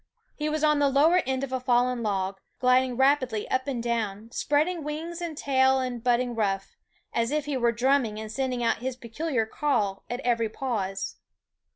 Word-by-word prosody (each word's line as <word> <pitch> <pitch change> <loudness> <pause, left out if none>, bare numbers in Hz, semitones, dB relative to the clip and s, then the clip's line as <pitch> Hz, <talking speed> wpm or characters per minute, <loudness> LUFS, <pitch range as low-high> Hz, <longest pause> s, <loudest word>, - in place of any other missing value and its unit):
He 300 0 -2
was 310 0 -1
on 300 -1 +4
the 285 -1 +4
lower 315 +7 +4
end 265 0 -1
of 275 - -4
a 260 - -1
fallen 250 0 +2
log, 195 -3 -1 0.2
gliding 255 -1 +3
rapidly 265 -5 +2
up 260 +1 0
and 250 -4 -2
down, 225 -2 -2
spreading 310 +6 0
wings 325 +4 -5
and 330 -3 -4
tail 265 -1 +3
and 250 -3 -3
bud 245 -1 +4
ding 245 0 -2
ruff, 195 -3 -1 0.4
as 230 0 +1
if 300 0 -1
he 290 -1 -2
were 240 -2 +2
drumming, 240 -2 +1
and 220 0 -6
send 265 +2 -1
ing 240 - -2
out 230 - +2
his 255 +1 -4
peculiar 245 +1 -2
call 215 -6 -1
at 245 +1 -3
every 235 -3 +1
pause. 210 -6 -3
255 Hz, 195 wpm, -27 LUFS, 230-280 Hz, 0.4 s, on